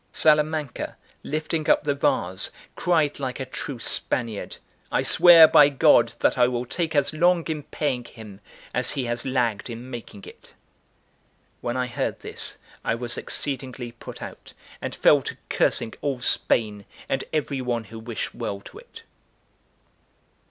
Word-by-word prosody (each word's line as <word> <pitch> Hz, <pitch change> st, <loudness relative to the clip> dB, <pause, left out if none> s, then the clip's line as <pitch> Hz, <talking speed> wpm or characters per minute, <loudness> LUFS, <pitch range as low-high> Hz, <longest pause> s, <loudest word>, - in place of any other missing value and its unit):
Salamanca, 150 Hz, -3 st, +1 dB, 0.2 s
lifting 155 Hz, +1 st, -2 dB
up -, -, +4 dB
the 145 Hz, -1 st, +1 dB
vase, 95 Hz, -9 st, 0 dB, 0.3 s
cried 160 Hz, -5 st, +1 dB
like 130 Hz, -1 st, -4 dB
a 130 Hz, -, -3 dB
true 135 Hz, +1 st, -6 dB
Spaniard: 115 Hz, -1 st, -3 dB, 0.3 s
"I -, -, +1 dB
swear 170 Hz, -2 st, +8 dB
by 145 Hz, -2 st, +7 dB
God 140 Hz, -, +4 dB
that -, -, +2 dB
I 120 Hz, -, +6 dB
will 125 Hz, 0 st, -2 dB
take 160 Hz, +4 st, -3 dB
as 145 Hz, +1 st, +2 dB
long 175 Hz, +1 st, +3 dB
in 155 Hz, -2 st, -3 dB
paying 135 Hz, -4 st, -3 dB
him 105 Hz, -5 st, -12 dB, 0.3 s
as -, -, +2 dB
he 130 Hz, -, -2 dB
has 120 Hz, +2 st, -3 dB
lagged 120 Hz, -4 st, 0 dB
in 120 Hz, +2 st, -8 dB
making 115 Hz, -4 st, -9 dB
it." -, -, -15 dB, 1.0 s
When 120 Hz, +1 st, -3 dB
I 125 Hz, -, 0 dB
heard 120 Hz, -, -3 dB
this, -, -, -2 dB, 0.3 s
I -, -, 0 dB
was 120 Hz, 0 st, -3 dB
exceedingly 130 Hz, -3 st, -3 dB
put 115 Hz, -, -10 dB
out, -, -, -10 dB, 0.3 s
and -, -, -4 dB
fell -, -, +5 dB
to -, -, -6 dB
cursing 110 Hz, -, +1 dB
all 140 Hz, -3 st, -1 dB
Spain 105 Hz, -4 st, +1 dB, 0.2 s
and 135 Hz, -, -1 dB
every 145 Hz, -3 st, -1 dB
one 120 Hz, -2 st, -2 dB
who 110 Hz, +1 st, -10 dB
wished 115 Hz, 0 st, -5 dB
well 100 Hz, -, -4 dB
to -, -, -12 dB
it. -, -, -14 dB
130 Hz, 155 wpm, -24 LUFS, 120-150 Hz, 1.0 s, swear